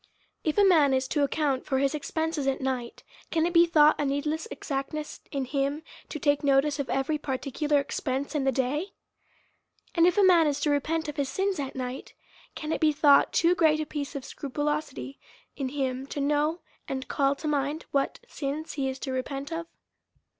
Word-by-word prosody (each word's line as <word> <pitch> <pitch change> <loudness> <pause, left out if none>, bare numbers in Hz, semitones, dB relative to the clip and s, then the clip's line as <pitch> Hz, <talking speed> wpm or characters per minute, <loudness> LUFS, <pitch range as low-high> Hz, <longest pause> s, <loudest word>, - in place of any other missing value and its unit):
If 310 +2 -1
a 410 - +6
man 305 -8 +5
is 260 0 0
to 295 - +1
account 280 -2 0
for 265 - +1
his 275 +2 +1
expenses 315 -1 -2
at 270 - +1
night, 255 -3 -3 0.3
can 325 -1 +1
it 345 - -1
be 340 0 +6
thought 305 -2 +5
a - - 0
needless 300 +6 -1
exactness 300 +2 -4
in 275 -2 -2
him, 280 +3 -1 0.3
to - - -4
take 290 0 +1
notice 280 +1 +3
of 280 - -3
every 275 +3 0
particular 285 +2 0
expense 280 0 -3
in 295 -3 0
the 270 - +2
day? 275 +9 -1 1.0
And 335 -1 +5
if 360 - +2
a 410 - +5
man 345 -4 +6
is 290 -1 0
to 295 - +2
repent 320 +3 0
of 295 - -6
his 280 -2 0
sins 385 +3 -1
at 275 -2 -4
night, 255 0 -5 0.4
can 305 0 -4
it - - -1
be 310 -1 +5
thought 290 -1 +5
too 340 +1 +4
great 320 -3 +3
a 310 - -1
piece 290 -1 -5
of 275 -2 -5
scrupulosity 290 -1 -3 0.4
in 270 -2 -3
him, 265 -1 -2
to 290 - -5
know 295 +4 +1 0.3
and 265 -1 -3
not - - -10
call 275 0 +1
to 305 - -6
mind 295 +1 -1
what 275 -1 0
sins 295 +2 -4
he 270 -2 -1
is 260 - -5
to 270 0 -5
repent 275 +3 -4
of? 330 0 -4
290 Hz, 200 wpm, -27 LUFS, 270-310 Hz, 1.0 s, a